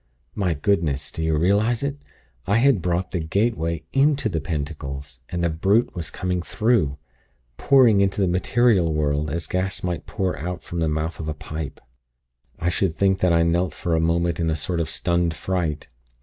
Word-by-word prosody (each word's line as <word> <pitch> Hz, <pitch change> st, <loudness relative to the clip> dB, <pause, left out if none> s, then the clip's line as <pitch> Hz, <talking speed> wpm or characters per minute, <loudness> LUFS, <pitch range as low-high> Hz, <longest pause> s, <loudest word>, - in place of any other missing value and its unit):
My 90 Hz, -5 st, 0 dB
Goodness! 75 Hz, -4 st, 0 dB
do -, -, -5 dB
you 80 Hz, -1 st, +1 dB
realize 105 Hz, -, +2 dB
it! 140 Hz, +1 st, -3 dB, 0.5 s
I 100 Hz, +3 st, +3 dB
had 125 Hz, -5 st, +4 dB
brought 90 Hz, +1 st, -1 dB
the 90 Hz, -, -1 dB
'gateway' 85 Hz, -2 st, -1 dB
into 135 Hz, -3 st, +3 dB
the 80 Hz, -5 st, -2 dB
pentacles, 70 Hz, -3 st, -5 dB
and 85 Hz, -1 st, -2 dB
the 85 Hz, -, +2 dB
brute 100 Hz, +9 st, +2 dB
was 85 Hz, -3 st, -4 dB
coming 90 Hz, -1 st, -2 dB
through 105 Hz, -, +1 dB, 0.6 s
pouring 125 Hz, -7 st, +5 dB
into 100 Hz, 0 st, +1 dB
the 95 Hz, -, +3 dB
material 95 Hz, 0 st, +2 dB
world, 75 Hz, -1 st, 0 dB
as 80 Hz, +1 st, -3 dB
gas 95 Hz, +4 st, -2 dB
might 90 Hz, -4 st, -3 dB
pour 95 Hz, -2 st, -1 dB
out 90 Hz, +3 st, -4 dB
from 85 Hz, -, -5 dB
the 80 Hz, -1 st, +1 dB
mouth 80 Hz, +2 st, -2 dB
of 80 Hz, -, -5 dB
a 75 Hz, -, -3 dB
pipe. 75 Hz, -1 st, -6 dB, 0.8 s
"I 85 Hz, -, -3 dB
should 90 Hz, -1 st, 0 dB
think 95 Hz, 0 st, +2 dB
that 90 Hz, -2 st, +3 dB
I 85 Hz, 0 st, +4 dB
knelt 85 Hz, +2 st, +1 dB
for 85 Hz, -, -2 dB
a -, -, +2 dB
moment 85 Hz, +1 st, +1 dB
in 85 Hz, -1 st, +1 dB
a 80 Hz, -, +1 dB
sort 80 Hz, +3 st, -2 dB
of 80 Hz, -1 st, -1 dB
stunned 85 Hz, -1 st, 0 dB
fright. 80 Hz, -2 st, -2 dB
85 Hz, 190 wpm, -23 LUFS, 80-95 Hz, 0.8 s, pouring